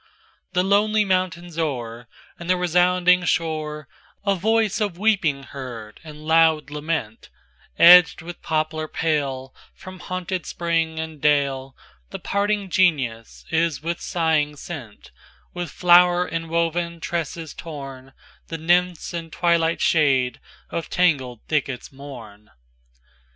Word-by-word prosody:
XXThe 180 +1 +2
lonely 210 +1 +3
mountains 175 -3 -1
o'er, 120 -6 -3 0.3
And 170 0 -8
the 185 - +3
resounding 180 +1 +3
shore,A 155 +3 -3
voice 220 +3 +1
of 200 -5 -1
weeping 185 -10 +1
heard 120 -6 -9
and 155 -1 -11
loud 160 -2 +3
lament; 150 - -4 0.5
Edgèd 175 -1 +8
with 175 +1 -9
poplar 155 0 -2
pale, 140 -5 -2 0.2
From 185 0 -11
haunted 185 0 -4
spring, 165 -2 -1
and 160 -2 -6
daleThe 140 +5 -2
parting 200 -1 -1
Genius 135 -12 0
is 165 -2 0
with 170 +1 -3
sighing 160 -3 0
sent; 140 -8 -9 0.4
With 175 -2 -4
flower 180 +1 +5
inwoven 170 +1 -2
tresses 165 -1 -4
tornThe 135 +1 -10
Nymphs 175 +1 +1
in 165 -1 -5
twilight 170 -1 +1
shade 135 -6 +2 0.3
of 165 - -4
tangled 135 -10 +1
thickets 140 -5 -2
mourn. 120 -7 -11
165 Hz, 110 wpm, -22 LUFS, 145-180 Hz, 0.5 s, Edgèd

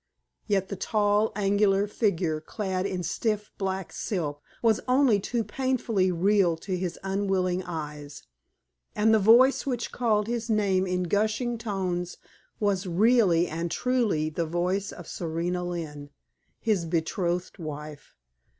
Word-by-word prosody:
Yet 195 -3 +1
the 200 - -3
tall, 210 +2 +1
angular 200 0 +2
figure 175 -7 0
clad 190 +2 -2
in 185 -2 -3
stiff 210 +2 -2
black 190 -2 -3
silk 150 -8 -3 0.2
was 225 -2 +3
only 255 -4 +4
too 230 +4 -1
painfully 225 -4 0
real 180 -1 +3
to 185 +3 -4
his 180 -1 -3
unwilling 190 -2 0
eyes; 150 -4 -7 0.7
and 220 +1 +4
the 220 - +5
voice 240 +8 +5
which 245 -3 -2
called 215 -4 +1
his 235 0 -3
name 195 -3 +2
in 180 0 0
gushing 215 +6 0
tones 185 -5 -3 0.4
was 200 -2 0
really 185 -2 +4
and 165 +1 -3
truly 215 -8 0
the 165 +1 -2
voice 180 +4 -1
of 175 - -10
Serena 175 +2 -2
Lynne, 155 -5 -5 0.5
his 210 -7 0
betrothed 175 +2 -2
wife. 150 -2 -8
190 Hz, 130 wpm, -27 LUFS, 175-215 Hz, 0.7 s, the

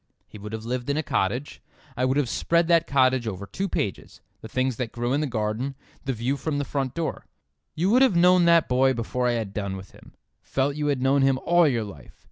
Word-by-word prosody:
He 105 - -12
would 105 +1 -8
have 110 0 -6
lived 125 +2 -3
in 140 - 0
a 155 - 0
cottage. 125 +4 -2 0.3
I 125 +1 +1
could 130 +2 +1
have 145 -3 +1
spread 170 +6 +1
that 170 -1 +3
cottage 130 -3 +2
over 100 -2 -5
two 195 - -4
pages; 100 - -4 0.2
the - - -8
things 130 +1 -1
that 125 -3 -3
grew 120 +1 -2
in 145 - +1
the 150 - -1
garden, 115 +3 -2 0.3
the 135 - 0
view 125 +4 -1
from 150 0 -2
the 145 - -1
front 135 -1 -3
door. 165 -1 -4 0.5
You 180 +5 +1
would 250 +3 +5
have 260 -9 +4
known 180 +1 +5
that 170 -1 +5
boy 130 +1 +3
before 125 +2 -1
I 120 - +2
had 110 -4 -3
done 100 -2 -3
with 95 0 -11
him—felt 140 +1 -5
you 150 0 -2
had 140 -3 0
known 135 +1 +3
him 135 -1 +3
all 175 -1 +5
your 120 -5 0
life. 100 -9 -11
130 Hz, 235 wpm, -25 LUFS, 115-150 Hz, 0.5 s, would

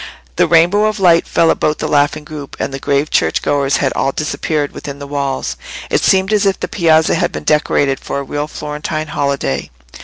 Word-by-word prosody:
The - - +4
rainbow 185 +6 +4
light 175 -4 +4
fell 165 - +3
about 150 0 0
the - - -3
laughing 145 +1 +1
group, 150 -2 -9
and - - -3
the 135 - -4
grave 140 +2 0
church - - +1
goers 140 -1 +1
had 135 - 0
all 135 - 0
disappeared 150 0 -2
within 140 -1 -7
the 140 - -8
walls. 140 -2 -3 0.3
It - - +2
seemed 190 +2 +2
as 205 -1 +3
if 195 - 0
the - - -3
piazza 160 -4 +3
had 175 0 0
been - - -6
decorated 145 -2 +1
for - - -5
a 140 - -2
real 145 +2 -3
Florentine 150 +1 -5
holiday. 140 - -2
150 Hz, 195 wpm, -16 LUFS, 140-165 Hz, 0.3 s, The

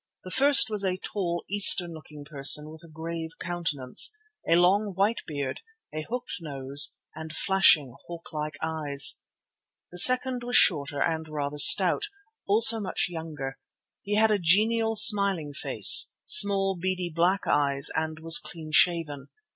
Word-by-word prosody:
The 185 - -12
first 280 0 +4
was 210 -2 -2
a 185 -1 -4
tall, 175 -3 -7
Eastern 190 -3 +3
looking 150 -2 -15
person 150 +1 +3
with 160 0 -15
a - - -17
grave 160 +1 -10
countenance, 165 - -1 0.4
a 165 - +2
long, 195 +4 -1
white 205 +5 -3
beard, 140 -3 -8 0.3
a 155 - -7
hooked 245 +1 -8
nose, 140 -2 -2 0.2
and 160 0 -11
flashing, 155 -7 +1
hawk 170 -2 -13
like 150 -1 -8
eyes. 150 -3 +1 0.7
The 180 - -2
second 255 +2 +4
was 245 +1 -6
shorter 145 -4 +1
and 160 -1 -5
rather 150 -1 -7
stout, 190 - +5 0.4
also 220 +2 +5
much 195 -3 -5
younger. 155 -5 -10 0.4
He 205 +1 -5
had 220 +1 +1
a 210 - -2
genial, 225 +6 -1
smiling 200 -9 +4
face, - - +3
small, 195 - +2
beady 180 0 -6
black 180 +4 -2
eyes, 140 -1 0
and 160 0 -6
was 165 0 +3
clean 160 -2 -12
shaven. 155 -4 -1
170 Hz, 145 wpm, -23 LUFS, 150-200 Hz, 0.7 s, stout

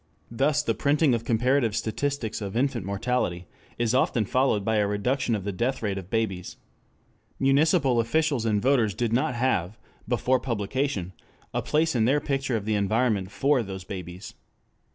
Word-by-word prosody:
Thus 140 +5 +1
the - - 0
printing 145 -1 +2
of 115 -1 -1
comparative 120 -1 +2
statistics 115 -1 -2
of 100 +1 -4
infant 125 -7 0
mortality 100 -4 -1 0.3
is 120 -1 0
often 125 -3 +2
followed 120 -3 +1
by 110 -1 +1
a 105 -1 +2
reduction 115 +4 0
of 100 - -4
the 100 - -2
death 120 +6 -2
rate 100 -2 -1
of 95 -1 -11
babies. 110 -6 -2 0.8
Municipal 135 -1 +3
officials 140 +2 +1
and 110 -2 +1
voters 120 -5 +2
did 120 -2 -1
not 125 0 +1
have, 110 -6 0 0.3
before 130 0 +1
publication, 115 -4 -2 0.4
a - - 0
place 160 +2 +1
in 115 -3 +2
their 140 +5 +3
picture 135 -3 -1
of 105 - -6
the 110 - 0
environment 105 -1 +1
for 135 +4 +2
those 95 -3 -6
babies. 90 +1 -8
115 Hz, 165 wpm, -26 LUFS, 105-135 Hz, 0.8 s, Municipal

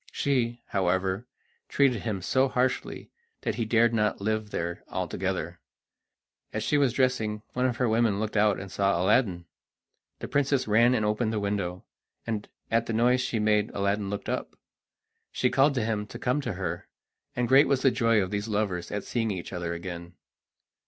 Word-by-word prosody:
She, 120 -4 0
however, 95 +3 0 0.4
treated 130 -6 +2
him 100 -6 -3
so 130 +6 +2
harshly 130 0 -1 0.3
that - - -1
he 115 - -2
dared 115 +1 +3
not 105 -2 +1
live 110 +1 -1
there 85 -3 -4
altogether. - - -3 0.9
As - - -3
she - - +1
was 140 -4 +3
dressing, 115 -5 0
one 125 +1 +1
of 120 -2 -2
her 125 - +1
women 110 -2 +2
looked 110 0 -3
out 105 -1 +3
and 95 -1 -8
saw 100 -3 +1
Aladdin. 95 -2 +2 0.7
The - - -6
princess 140 -2 +1
ran 115 +4 +4
and 110 -3 +1
opened 110 +2 0
the 110 - -1
window, 100 -3 -2 0.4
and 110 -3 -3 0.2
at 115 +1 +2
the 115 - -2
noise 125 +3 +3
she 120 - -1
made 105 -1 +2
Aladdin 100 0 0
looked 100 0 -5
up. - - -3 0.8
She 125 - +1
called 135 +2 +4
to 120 -4 0
him 105 -2 -2
to 120 - -8
come 125 +4 0
to 120 -6 -3
her, 85 -2 -4 0.5
and 125 -1 0
great 135 +4 +6
was 135 -2 +1
the 135 - +5
joy 115 -4 +3
of 95 - -5
these 105 +1 -2
lovers 100 -5 -2
at 105 -1 -3
seeing 115 -2 -1
each 95 -2 -5
other 85 -1 -3
again. 85 0 -7
110 Hz, 180 wpm, -27 LUFS, 100-125 Hz, 0.9 s, great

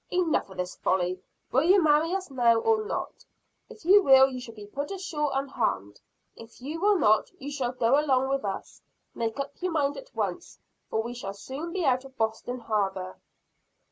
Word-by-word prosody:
"Enough 350 - +1
of 190 - -12
this 180 0 -3
folly. 185 0 0 0.3
Will 265 - +4
you 370 +6 +5
marry 310 +2 +3
us 375 -6 -4
now 240 -3 +4
or 435 - +2
not? 425 - -5 0.5
If 385 - -14
you 400 +3 +7
will, 265 -5 +7
you 255 - -5
shall 230 -2 -10
be 210 -1 -10
put 285 +8 -5
ashore 335 -6 -2
unharmed. 230 - -2 0.3
If 230 0 -14
you 300 +6 -6
will 410 0 +4
not, 215 -9 +3
you 285 +2 -6
shall 260 -3 -2
go 250 +2 +3
along 265 -3 +2
with 275 0 0
us. 195 -2 -5 0.3
Make 230 +2 -3
up 275 0 -3
your 365 0 -1
mind 285 -2 0
at - - -11
once, - - -3 0.3
for 220 - 0
we 240 +1 -5
shall 200 -5 -6
soon 275 +11 -6
be 360 -2 -1
out 260 -1 +2
of 270 0 -14
Boston 225 +3 -2
harbor." 195 -4 -2
265 Hz, 195 wpm, -27 LUFS, 225-310 Hz, 0.5 s, you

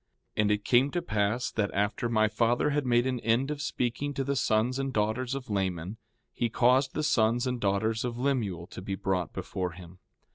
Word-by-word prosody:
4:8 - - +3
And 105 0 +2
it 105 0 0
came 130 +3 +4
to 175 +3 -2
pass 110 -1 0
that 105 -2 0
after 105 +4 0
my 110 -2 +3
father 120 +6 +1
had 145 -2 0
made 120 0 +3
an 130 -1 -1
end 115 +6 +1
of 145 -1 -4
speaking 140 +1 -2
to 135 - -1
the 140 +1 -1
sons 125 +1 +1
and 135 0 -1
daughters 120 +4 0
of 135 -2 -6
Laman, 95 -1 -2 0.4
he 120 - -1
caused 125 +4 +3
the 155 - -1
sons 115 -2 +2
and 125 -2 -2
daughters 105 +3 +1
of 120 -1 -3
Lemuel 115 -11 -1
to 95 - -9
be 95 +1 -3
brought 95 -2 -1
before 90 -1 -4
him. 90 0 -13
115 Hz, 210 wpm, -29 LUFS, 105-130 Hz, 0.4 s, came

